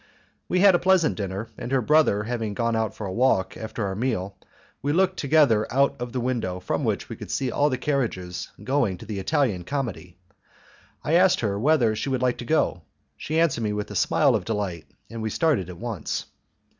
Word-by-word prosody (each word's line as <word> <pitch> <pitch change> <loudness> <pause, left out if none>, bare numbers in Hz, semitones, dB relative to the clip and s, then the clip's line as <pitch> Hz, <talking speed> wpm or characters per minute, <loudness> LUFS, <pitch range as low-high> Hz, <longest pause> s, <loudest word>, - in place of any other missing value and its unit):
We 180 - +2
had 200 -1 +7
a 175 - +3
pleasant 185 -3 +3
dinner, 100 +2 -4
and 120 - -5
her 135 - +3
brother 140 -5 +3
having 110 -2 -3
gone 115 +1 0
out 110 -1 -1
for 105 - -6
a 95 - -4
walk 115 -5 +2
after 110 -1 -4
our 95 - -2
meal 100 -3 -2 0.5
we 145 - 0
looked 185 +2 +2
together 140 -7 +3
out 140 +2 +3
of 120 0 -4
the 125 - -2
window 120 -7 -2
from - - -2
which - - -1
we - - -6
could - - -9
see 130 -2 -1
all 145 +4 +2
the 130 - -1
carriages 115 -11 -2
going 120 -9 +1
to 105 - -11
the 105 -2 -4
Italian 115 - 0
Comedy. 110 -8 -4 0.9
I 155 - -1
asked 180 +2 +5
her 100 -3 -1
whether 125 -4 +3
she 135 - -3
would 130 -1 -1
like 125 -1 +1
to 120 - -6
go; 120 - +1 0.3
she 155 +1 -2
answered 165 -8 +2
me 105 -1 0
with 105 0 -4
a - - -6
smile 140 -4 +3
of 110 -5 0
delight, 100 -6 -3 0.2
and 115 -1 -6
we 110 - -2
started 135 - +1
at 90 - -8
once. 115 -6 -4
120 Hz, 210 wpm, -25 LUFS, 105-145 Hz, 0.9 s, had